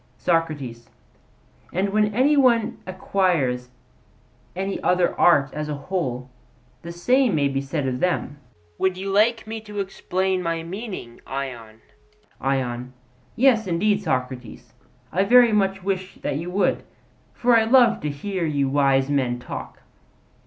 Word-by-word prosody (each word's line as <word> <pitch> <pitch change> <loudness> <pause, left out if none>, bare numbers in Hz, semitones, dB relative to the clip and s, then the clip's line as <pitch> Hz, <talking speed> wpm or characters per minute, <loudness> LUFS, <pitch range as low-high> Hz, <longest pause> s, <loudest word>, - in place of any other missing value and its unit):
SOCRATES: 145 -9 -2 0.8
And 190 +3 0
when 210 +1 +2
any 275 +5 +4
one 240 -5 +3
acquires 175 -10 0 0.9
any 195 +2 -3
other 180 -1 +2
art 145 -5 +4
as 150 0 -4
a 150 - -2
whole, 140 -5 -3 0.5
the 170 - -7
same 245 +5 +2
may 145 -2 +2
be 135 0 -1
said 140 0 -3
of 125 -1 -2
them. 175 -5 -1 0.4
Would 190 -1 +1
you 195 +1 -4
like 225 +4 +2
me 220 0 -6
to 210 -1 -7
explain 190 -1 -1
my 165 -1 -2
meaning, 185 - -7
Ion? 120 -5 -6 0.6
ION: 130 -2 -2 0.4
Yes, 230 -4 +3
indeed, 200 +4 +1
Socrates; 130 - -4 0.4
I 190 +4 +2
very 240 +2 +6
much 195 -2 +1
wish 190 -1 -3
that 140 - -1
you 170 +3 -5
would: 195 +3 +1 0.5
for 245 0 +3
I 225 -1 +4
love 240 -1 +5
to 150 - -2
hear 180 +6 -4
you 145 -4 0
wise 135 -1 +2
men 130 -4 0
talk. 120 - -8
175 Hz, 140 wpm, -23 LUFS, 135-205 Hz, 0.9 s, very